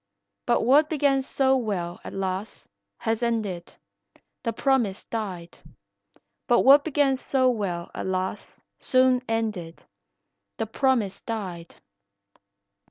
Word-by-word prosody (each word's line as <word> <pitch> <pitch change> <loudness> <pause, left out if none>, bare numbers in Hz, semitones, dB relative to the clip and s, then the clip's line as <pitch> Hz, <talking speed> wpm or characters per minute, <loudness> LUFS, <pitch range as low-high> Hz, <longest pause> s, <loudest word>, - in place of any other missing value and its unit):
But - - +3
what 285 +6 +5
began 280 -3 +2
so 265 0 +2
well, 185 -7 -3
alas, 195 +1 -4 0.3
has 225 0 -1
ended, 215 -7 -2 0.7
The 230 - -1
promise 240 -7 0
died. 190 -7 -6 0.9
But 240 - +4
what 280 +2 +7
began 285 -3 +2
so 260 -1 +2
well 185 -7 -3
alas 185 +1 -4 0.2
soon 255 -1 +3
ended, 215 -7 -3 0.7
The 225 - -1
promise 230 -3 0
died. 185 -7 -6
225 Hz, 100 wpm, -25 LUFS, 190-265 Hz, 0.9 s, what